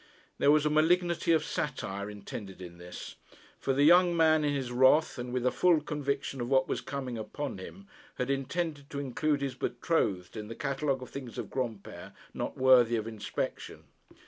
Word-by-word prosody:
There - - +4
was 150 0 +5
a 150 - +2
malignity 170 +2 +2
of 160 -1 +3
satire 100 -11 -3
intended 100 -1 -8
in 85 -2 -10
this; 90 0 -9 0.4
for - - -1
the 140 +2 +3
young 175 +2 +6
man 155 -1 +4
in 145 - +1
his 135 -3 -2
wrath, 130 +4 +4
and 120 0 -5
with 125 0 -1
a 125 - +3
full 175 -3 +4
conviction 140 -3 -3
of 120 - -3
what 135 -1 +3
was - - -2
coming 130 -4 -5
upon 125 +1 -5
him, 195 - -10 0.3
had 125 +2 -1
intended 145 +1 -3
to 140 - -4
include 145 +2 -1
his 135 -2 -2
betrothed 100 - -1
in 105 -1 -6
the 115 - -7
catalogue 135 -1 -1
of - - -11
things 130 -4 -8
of - - -5
Granpere 115 -6 -5 0.2
not - - -4
worthy 125 -3 +5
of 110 -2 -2
inspection. 110 -2 -5
135 Hz, 185 wpm, -30 LUFS, 120-150 Hz, 0.4 s, young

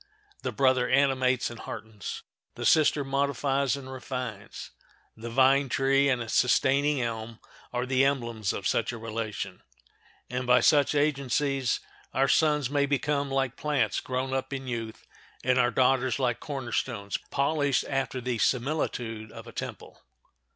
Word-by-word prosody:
The - - -2
brother 130 -2 +2
animates 130 -2 +2
and 115 - -9
heartens; 110 -3 -7 0.3
the - - -5
sister 150 -2 +4
modifies 140 0 0
and 130 -1 -8
refines. 125 -5 -6 0.4
The 115 +1 -7
vine 135 +3 +4
tree 135 +1 +3
and 125 -3 +1
its 115 - -6
sustaining 140 +3 +3
elm 115 -1 -4 0.3
are 125 +1 -1
the 130 +1 +2
emblems 120 -7 0
of 100 - -5
such 115 - +1
a 120 - -6
relation; 110 -1 -5 0.7
and 125 0 -3
by 125 0 +6
such 145 -1 +4
agencies 140 -2 +1 0.3
our 135 +1 +3
"sons 150 -2 +3
may 140 +1 +1
become 140 0 0
like 135 -1 0
plants 150 -2 0
grown 130 +1 -3
up 135 0 -2
in 135 -1 -4
youth, 115 -3 -5 0.4
and 130 0 +3
our 120 -1 +4
daughters 130 -1 +2
like 125 -3 0
corner 135 -5 -5
stones 100 -6 -2
polished 140 -1 +1
after 135 -1 -2
the 125 -2 -2
similitude 120 -5 -1
of - - -10
a - - -10
temple." - - -7
130 Hz, 150 wpm, -28 LUFS, 120-140 Hz, 0.7 s, by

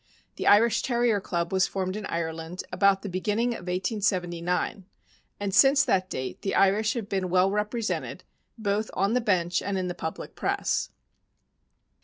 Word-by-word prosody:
The - - -2
Irish 220 +3 +5
Terrier 235 -4 +1
Club 170 -1 -2
was 190 0 +3
formed 185 -1 -3
in 210 -1 -5
Ireland 165 +1 -4
about 195 +1 +3
the - - -4
beginning 210 +6 0
of 205 -7 -5
1879, 180 -2 -1 0.5
and 200 -1 -3
since 275 +5 +6
that 185 -1 +1
date 130 0 -5
the 195 - -2
Irish 210 +4 +3
have 225 -4 -4
been 190 -2 -2
well 185 +2 +3
represented, 210 +2 -2 0.3
both 215 0 -1
on 195 +3 +1
the 250 - +2
bench 180 -5 +1
and 200 -1 -2
in 185 -1 -2
the - - -2
public 160 -2 -6
press. - - -1
195 Hz, 160 wpm, -27 LUFS, 180-210 Hz, 0.5 s, since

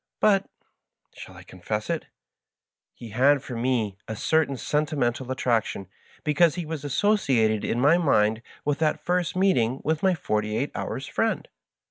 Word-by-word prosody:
But 200 -2 +3 0.3
— - - -41
ehall - - -11
I - - -12
confess 105 +4 -5
it? 165 -2 -3 0.4
— - - -46
^he 115 -3 -9
had 135 +5 +3
for 125 - -7
me 115 -5 -1
a 110 - -4
certain 150 +2 +1
sentimental 140 -4 -1
attraction, 115 -6 0 0.4
because 155 +2 +3
he 175 -2 -4
was 155 -2 -5
associated 135 - +2
in 120 - -1
my 150 +7 +5
mind 110 -8 +2 0.2
with 145 0 0
that 155 -1 0
first 180 -1 0
meeting 135 -10 +2
with 160 0 0
my 190 -2 +3
forty 105 -7 -1
eight - - -2
honrs' - - -4
friend. - - -1
140 Hz, 160 wpm, -25 LUFS, 115-160 Hz, 0.4 s, my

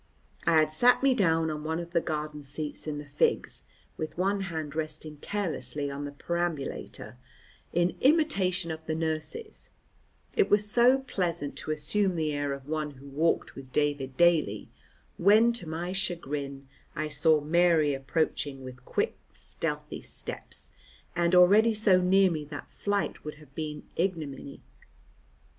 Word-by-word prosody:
I 170 - +5
had 155 -1 +4
sat 245 +10 +4
me 275 -1 +5
down 165 -7 +2
on 150 -1 -5
one 160 +1 -1
of 170 0 -7
the 170 -2 +2
garden 150 -1 -3
seats 145 +2 -4
in 150 -1 -2
the 145 - -6
Figs, 145 0 0 0.4
with 155 +1 -5
one 195 +2 +1
hand 160 -6 -4
resting 155 -1 -5
carelessly 155 -6 -3
on 140 +1 -5
the 145 - -5
perambulator, 165 -5 -4 0.5
in 175 +1 +1
imitation 200 - +2
of 160 0 -6
the 155 - -1
nurses, 160 - -4 0.7
it 420 - +3
was 210 0 +4
so 245 +5 +5
pleasant 175 - -3
to - - -6
assume 180 +6 +1
the 155 -2 0
air 145 -1 -1
of 140 0 -6
one 155 -1 -2
who 140 +2 -12
walked 155 +4 +1
with 130 -1 -11
David 145 -3 0
daily, 160 -12 +3 0.5
when 215 +5 +5
to 200 -9 -5
my 170 +3 -3
chagrin 140 -7 -3 0.3
I 155 0 -1
saw 150 +1 +3
Mary 160 -1 +3
approaching 135 0 -2
with 125 -1 -10
quick - - -1 0.2
stealthy - - -5
steps, - - -7 0.4
and 170 +1 +3
already 210 +5 +6
so 200 -4 +4
near 190 +1 +4
me 155 -2 -2
that 145 -1 -8
flight 205 0 -2
would 150 0 -6
have 150 -3 -18
been 150 0 -5
ignominy. 160 -6 -3
160 Hz, 150 wpm, -29 LUFS, 145-185 Hz, 0.7 s, already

